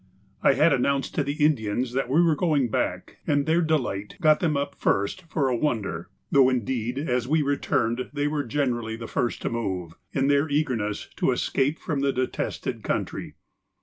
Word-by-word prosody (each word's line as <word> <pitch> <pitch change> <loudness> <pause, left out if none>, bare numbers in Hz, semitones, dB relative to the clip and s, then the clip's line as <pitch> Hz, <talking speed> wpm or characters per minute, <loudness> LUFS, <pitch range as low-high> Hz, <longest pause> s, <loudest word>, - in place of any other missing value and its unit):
I - - +5
had 165 +3 +4
announced 135 +1 0
to 145 - +1
the 145 +1 +1
Indians 120 -3 0
that 130 -1 -1
we 160 +6 +4
were 165 -2 +3
going 145 -6 +1
back, - - -2
and 145 -1 +2
their 165 +2 +3
delight 130 - -1
got 155 -1 +5
them 155 -5 +1
up 140 0 -2
first 100 - 0
for 140 -4 +1
a 125 - +1
wonder, 110 - -2 0.2
though 135 -2 +6
indeed 125 0 -1
as 125 -4 -1
we 155 +2 +2
returned 130 -4 0
they 145 0 -1
were 150 -1 -1
generally 120 -3 -1
the 115 0 -7
first 120 - -2
to - - 0
move, 95 -8 -3 0.2
in 135 0 +1
their 145 +2 +3
eagerness 125 -8 -1
to - - +2
escape 140 +3 0
from 150 -3 -3
the 140 0 +2
detested 130 -1 -3
country. - - -3
135 Hz, 180 wpm, -25 LUFS, 120-150 Hz, 0.2 s, though